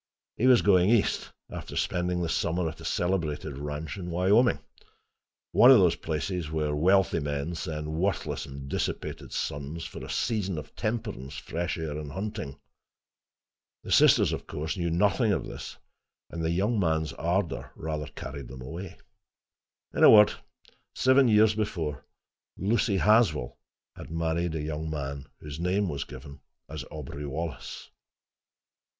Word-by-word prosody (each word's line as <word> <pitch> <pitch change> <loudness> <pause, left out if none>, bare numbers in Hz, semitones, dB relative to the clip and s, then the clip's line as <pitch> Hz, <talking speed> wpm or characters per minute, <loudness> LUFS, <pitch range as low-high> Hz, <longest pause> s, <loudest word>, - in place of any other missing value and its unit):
He 125 - +2
was 125 -2 +6
going 95 -2 +5
east, 115 -3 +2 0.2
after - - -7
spending 90 0 0
the - - -1
summer 85 +1 0
at 80 +1 -7
a - - -9
celebrated 80 -6 -1
ranch 75 +4 -5
in 90 -2 -5
Wyoming—one 100 +8 +3 1.1
of - - +10
those - - +4
places 80 +1 -3
where 75 -1 -1
wealthy 95 +2 +3
men 75 +2 -2
send 75 -2 -4
worthless 95 +2 -1
and 70 0 -8
dissipated - - -3
sons, 75 +4 -4
for - - -8
a - - -8
season 100 -7 -1
of 75 -1 -8
temperance, 105 - -3
fresh 85 +2 -3
air 80 -2 -4
and 75 -2 -7
hunting. 95 -8 -5 1.3
The - - -7
sisters, - - +5
of - - -5
course, 80 +5 -3
knew 85 -3 -1
nothing 100 +6 +2
of - - 0
this, - - -8 0.5
and 85 -1 -4
the 80 - +1
young 100 +7 +1
man's 80 -3 0
ardor 85 +1 -1
rather 75 -1 -4
carried 70 -1 -8
them 65 +1 -9
away. 85 +7 -7 1.0
In - - +1
a - - +10
word, 105 -1 +8 0.6
seven 130 0 +5
years 110 -1 +5
before, 85 -10 -3 0.5
Lucy 105 0 +1
Haswell 105 - +3 0.4
had - - -10
married 80 +1 -1
a 75 - -2
young 80 +1 -3
man 70 -2 -4
whose 75 0 -7
name 95 +3 +1
was 70 -2 -3
given 70 0 -11 0.3
as 75 -3 -6
Aubrey 75 -1 -6
Wallace. 80 +1 -6
80 Hz, 145 wpm, -28 LUFS, 75-95 Hz, 1.3 s, of